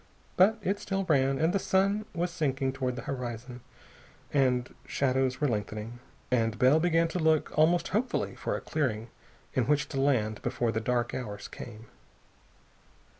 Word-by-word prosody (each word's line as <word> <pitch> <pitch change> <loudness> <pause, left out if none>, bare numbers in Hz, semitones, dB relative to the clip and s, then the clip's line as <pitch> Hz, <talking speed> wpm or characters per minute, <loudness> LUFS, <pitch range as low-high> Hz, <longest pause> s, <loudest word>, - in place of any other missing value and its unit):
But 200 +4 +5
it 200 +2 0
still 195 0 -2
ran, 135 -5 +2
and 160 +3 +2
the 200 - +2
sun 195 +3 +1
was 175 +1 -1
sinking 135 -5 -1
toward 130 -2 -2
the 120 - -6
horizon 125 -1 -5 0.7
and 125 -3 +2
shadows 130 -1 +1
were 150 - +2
lengthening, 110 +1 -3 0.3
and 115 -3 +1
Bell 130 +7 +5
began 165 0 +3
to 180 - -2
look 160 -1 +2
almost 165 +2 +3
hopefully 230 +6 -1
for - - -3
a - - -4
clearing 120 -7 -2 0.4
in 130 - +1
which 145 0 +2
to 135 -2 -1
land 110 -7 +1
before 120 -1 0
the 110 0 -1
dark 120 +1 0
hours 105 -5 -5
came. 115 -2 -10
135 Hz, 160 wpm, -29 LUFS, 120-165 Hz, 0.7 s, But